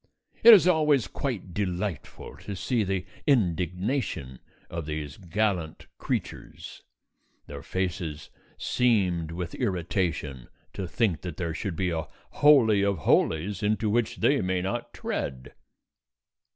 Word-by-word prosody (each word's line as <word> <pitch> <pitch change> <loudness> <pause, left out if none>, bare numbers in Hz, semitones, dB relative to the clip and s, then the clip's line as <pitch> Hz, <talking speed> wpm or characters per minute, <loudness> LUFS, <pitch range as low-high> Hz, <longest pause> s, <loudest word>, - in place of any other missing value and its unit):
It 235 - +10
is 180 -3 +4
always 150 - +3
quite 100 -4 -4
delightful 95 -3 -4
to 100 - -7
see 115 +4 0
the 95 -2 -2 0.2
indignation 90 - 0 0.3
of 85 -2 -6
these 75 -1 -5
gallant 95 -3 -2
creatures, - - -5 0.6
their 70 -1 -8
faces 85 -3 -4 0.3
seamed 95 -10 +1
with 85 0 -5
irritation 85 -8 -2 0.3
to 95 - -4
think 95 - 0
that 90 -4 -6
there 85 -2 -2
should 90 +1 -4
be 90 +1 -1
a 80 -1 -3 0.3
holy 120 -9 +6
of 100 -1 +1
holies 95 +6 +1
into 105 0 +1
which 120 0 +1
they 140 0 +3
may 95 -1 -1
not 110 +6 -3
tread. 65 -1 -5
95 Hz, 125 wpm, -27 LUFS, 85-110 Hz, 0.6 s, It